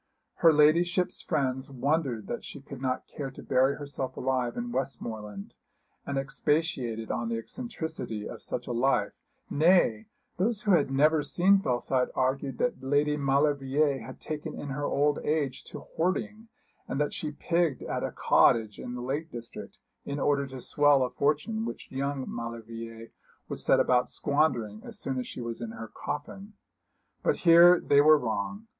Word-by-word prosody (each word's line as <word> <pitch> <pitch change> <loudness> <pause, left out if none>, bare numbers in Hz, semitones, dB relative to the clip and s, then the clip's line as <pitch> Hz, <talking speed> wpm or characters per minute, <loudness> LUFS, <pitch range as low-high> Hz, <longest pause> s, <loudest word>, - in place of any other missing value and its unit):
Her 165 - +6
ladyship's 175 +4 +3
friends 130 -1 -1
wondered 135 -4 -1
that - - -5
she - - -9
could 135 -1 -10 0.3
care 140 -2 -4
to 135 - -12
bury 130 +2 +2
herself 140 -2 -5
alive 125 -2 -1
in 120 0 -3
Westmoreland, 110 -6 -5 0.5
and 140 - -2
expatiated 135 -5 -1
on 120 -1 -2
the 115 - -1
eccentricity 155 - -5
of 110 - -9
such 125 - -5
a - - -5
life; 125 +3 +1 0.4
nay, 155 - +3 0.3
those 210 +3 0
who 205 - +2
had 150 -7 +4
never 150 +3 +3
seen 190 +6 +3
Fellside 125 -4 0
argued 135 +1 0
that 245 -1 -1
Lady 145 +2 +2
Maulevrier 140 0 +1
had 115 - -10
taken 155 0 -5
in 145 - -6
her 145 +2 -3
old 145 +1 +1
age 145 -4 -1
to - - -9
hoarding, 210 +6 -2 0.4
and - - -3
that 150 - 0
she 155 - -4
pigged 165 -1 0
at - - -3
a - - -1
cottage 110 -3 +3
in 125 - -6
the 125 - -5
Lake 145 +6 -3
district, 120 -3 -9 0.3
in 140 +1 -4
order 140 0 +1
to 130 -1 -8
swell 145 +1 +4
a 125 - -2
fortune 150 - 0
which 230 - -7
young 135 0 -2
Maulevrier 115 -1 -7 0.4
would - - -4
set - - +3
about 125 -1 +3
squandering 125 -8 0
as - - -9
soon 130 -1 -3
as 125 - -4
she - - -7
was 115 0 -5
in 115 - -4
her 115 -1 -8
coffin. 195 +8 -6 0.7
But - - +2
here 170 +1 +8
they 140 0 +4
were 155 +1 +7
wrong. 120 - -3
140 Hz, 165 wpm, -28 LUFS, 125-155 Hz, 0.7 s, here